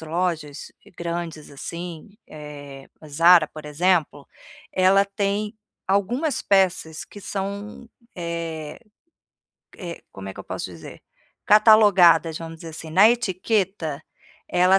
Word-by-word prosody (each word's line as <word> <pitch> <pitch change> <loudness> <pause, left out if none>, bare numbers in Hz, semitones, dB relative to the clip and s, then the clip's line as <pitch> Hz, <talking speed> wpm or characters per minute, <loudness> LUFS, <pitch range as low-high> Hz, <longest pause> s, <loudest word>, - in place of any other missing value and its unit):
lojas 160 -2 -3 0.2
grandes, 170 -2 -5
assim, 170 +5 -7 0.2
eh, 145 -2 -10
a - - -11
Zara, 165 +2 +6
por 155 0 -11
exemplo, 150 -2 0 0.5
ela 190 +1 +4
tem 200 +1 -2 0.3
algumas 235 - 0
peças 185 -5 +1
que 205 - -13
são, 200 +3 -5 0.3
eh 165 -3 -5 1.0
eh, 170 -3 -7
como 95 0 -8
é 95 - -7
que - - -16
eu - - -11
posso - - -5
dizer? - - -12 0.4
Catalogadas, 205 -7 +6
vamos 165 0 -8
dizer 165 +1 -10
assim, 160 0 -7
na 190 +7 +7
etiqueta, 190 -8 -1 0.5
ela 180 +2 +4
175 Hz, 120 wpm, -23 LUFS, 155-195 Hz, 1.0 s, na